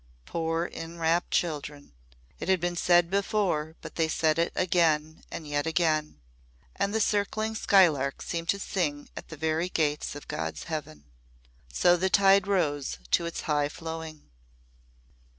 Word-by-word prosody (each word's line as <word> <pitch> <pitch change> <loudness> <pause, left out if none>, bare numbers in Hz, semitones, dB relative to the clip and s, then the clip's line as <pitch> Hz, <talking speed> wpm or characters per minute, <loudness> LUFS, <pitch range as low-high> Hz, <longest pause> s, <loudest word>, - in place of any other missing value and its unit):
Poor 165 - -1
enrapt 165 +1 -1
children! 145 - -2 0.5
It - - -4
has 190 - +5
been 175 0 -2
said 175 0 +3
before, 195 -6 0
but - - -9
they 165 -1 +2
said 160 0 +1
it 170 - +1
again 160 -3 +1
and 155 - -7
yet 145 +1 -1
again. 160 -2 +1 0.6
And 200 +1 0
the 220 - 0
circling 215 +1 0
skylark 165 -11 +3
seemed 170 0 -4
to 200 - +2
sing 155 -8 -2
at - - -8
the 160 - -9
very 160 +3 0
gates 150 -4 -1
of 145 - -10
God's 80 -1 -4
heaven. 150 - -6 0.7
So 175 - +4
the 190 +2 +1
tide 195 0 +5
rose 145 - 0
to 170 - +3
its 170 - -5
high 145 -1 0
flowing. 160 -1 -7
165 Hz, 150 wpm, -28 LUFS, 150-180 Hz, 0.7 s, has